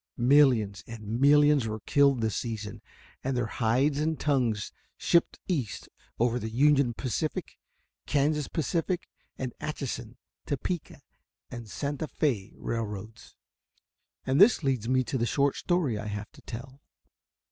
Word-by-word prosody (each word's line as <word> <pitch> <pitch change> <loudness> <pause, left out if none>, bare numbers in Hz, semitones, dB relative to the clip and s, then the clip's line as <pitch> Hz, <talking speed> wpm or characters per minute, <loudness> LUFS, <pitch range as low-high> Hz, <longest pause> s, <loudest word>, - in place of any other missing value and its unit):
Millions 120 -6 +4
and 115 +1 -5
millions 145 -2 +5
were 110 0 -4
killed 140 -2 +3
this 110 -2 0
season, 110 -4 -4 0.4
and 130 -1 -1
their 120 - +1
hides 125 +6 +1
and 155 +1 0
tongues 125 -8 0 0.3
shipped 170 - +2
east 140 - -2 0.3
over 120 +1 +1
the 110 - -4
Union 135 0 +3
Pacific, 140 +5 -3 0.5
Kansas 150 +1 +1
Pacific, 170 +3 -1 0.3
and 130 -2 -4
Atchison, 125 -5 -5 0.3
Topeka 145 +1 -3 0.5
and 120 -3 -7
Santa 145 +4 -3
Fé 120 -11 -1
railroads, 110 -1 -5 0.9
and 135 +5 +3
this 210 -4 +6
leads 130 -5 0
me 130 0 +3
to 130 +1 -2
the 120 - +1
short 140 +2 +2
story 160 - 0
I 105 - -5
have 105 0 -5
to - - -17
tell. 130 +4 -9
130 Hz, 135 wpm, -28 LUFS, 115-145 Hz, 0.9 s, this